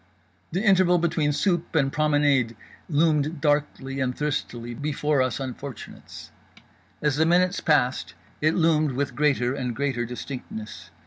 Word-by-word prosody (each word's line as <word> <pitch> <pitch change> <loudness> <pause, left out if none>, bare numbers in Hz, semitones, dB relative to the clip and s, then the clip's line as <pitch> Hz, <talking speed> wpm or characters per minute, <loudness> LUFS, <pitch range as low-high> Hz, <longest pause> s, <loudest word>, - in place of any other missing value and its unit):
The 185 +5 -1
interval 185 -3 +4
between 165 -3 +1
soupe 175 +2 0
and 135 -3 +2
promenade 145 -6 +2 0.3
loomed 155 0 +1
darkly 145 -2 0
and 125 -1 -1
thirstily 120 -5 -3
before 145 +1 0
us 130 0 -1
unfortunates. 135 0 -8 0.7
As 145 -2 +1
the 160 - +3
minutes 180 +2 +3
passed, 130 -5 +1 0.3
it 155 +1 +2
loomed 155 -4 +2
with 140 +2 -2
greater 135 -4 +2
and 125 -4 -3
greater 135 -4 -1
distinctness. 125 -3 -7
145 Hz, 130 wpm, -25 LUFS, 130-160 Hz, 0.7 s, interval